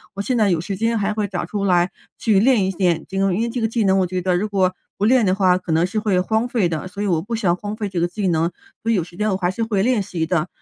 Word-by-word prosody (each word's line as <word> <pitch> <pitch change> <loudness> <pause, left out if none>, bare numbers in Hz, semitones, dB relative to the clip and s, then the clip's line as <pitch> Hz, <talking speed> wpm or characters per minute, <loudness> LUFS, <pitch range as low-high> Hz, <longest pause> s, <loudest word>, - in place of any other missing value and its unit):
我 200 - -2
现 255 +5 -1
在 210 -3 +3
有 170 -3 +1
时 195 +4 -4
间 225 +3 0
还 210 0 0
会 210 -1 -1
找 180 -3 -3
出 200 +3 -3
来 180 -1 +3 0.3
去 210 -4 +3
练 225 -3 +4
一 190 - 0
练 175 -4 0
这 195 - -3
个， 195 - +3
嗯， 180 - +1
因 210 - -1
为 235 - -1
这 240 +1 -3
个 225 - +2
技 225 0 0
能 190 0 +3
我 185 - +1
觉 185 +1 -2
得 180 0 +1
如 195 +4 0
果 185 -2 +1 0.2
不 205 - 0
练 250 +1 +4
的 185 -1 +2
话， 185 -2 +3
可 175 - -5
能 165 +2 +3
是 205 +4 -2
会 205 -4 +1
荒 220 +5 0
废 230 -7 +1
的。 165 +1 -4
所 200 +2 -7
以 - - -1
我 165 -4 +1
不 230 +5 -4
想 185 -6 +1
荒 205 +2 -5
废 215 -2 -3
这 185 -3 -3
个 175 - +2
技 195 +2 -3
能， 165 0 +1 0.3
所 230 - 0
以 - - +3
有 180 - +1
时 175 0 -14
间 210 +3 0
我 190 - 0
还 180 -2 0
是 225 +4 -3
会 205 -3 0
练 245 -3 +2
习 180 -5 -3
的。 160 -2 0
195 Hz, 355 characters per minute, -21 LUFS, 180-215 Hz, 0.3 s, 练